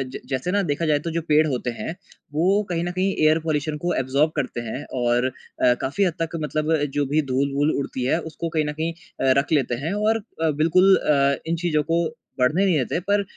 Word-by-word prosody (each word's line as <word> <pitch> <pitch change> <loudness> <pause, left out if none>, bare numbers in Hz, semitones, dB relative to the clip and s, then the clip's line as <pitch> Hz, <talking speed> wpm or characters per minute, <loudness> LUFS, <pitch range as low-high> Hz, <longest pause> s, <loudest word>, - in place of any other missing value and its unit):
ज - - -4
जैसे 130 +6 -1
ना 205 +1 +2
देखा 145 +3 0
जाए 150 -2 +2
तो 165 - -4
जो 170 - -1
पेड़ 155 -1 +3
होते 125 -3 -2
हैं 115 +8 -5 0.4
वो 185 +7 +3
कहीं 170 -1 -1
न 175 - -2
कहीं 190 +2 0
एयर 155 +1 +4
पॉल्यूशन 155 -1 -2
को 175 0 0
एब्जॉर्ब 140 +4 +1
करते 125 -4 -2
हैं 130 +6 -5 0.2
और, 120 +1 +2 0.4
अ, 125 - +5
काफ़ी 145 +10 0
हद 180 - +1
तक 165 - 0
मतलब 155 +2 0 0.2
जो 145 -1 +1
भी 150 +3 +1
धूल-वूल 140 +3 +1
उड़ती 130 -2 -3
है 150 - +2
उसको 165 +1 -5
कहीं 155 - +2
न 150 - -2
कहीं 165 +1 -1
अ, 135 -5 -2
रख 145 - -3
लेते 135 -6 +2
हैं 165 +6 -1
और 215 +2 +2 0.2
अ, 160 - +3
बिल्कुल 185 +4 +5
अ, 140 -2 +2
इन 165 - +1
चीज़ों 160 -3 0
को 170 0 +3 0.4
बढ़ने 150 +10 +3
नहीं 185 -4 +3
देते 135 +5 -1
पर 205 0 +3
155 Hz, 225 wpm, -23 LUFS, 140-170 Hz, 0.4 s, अ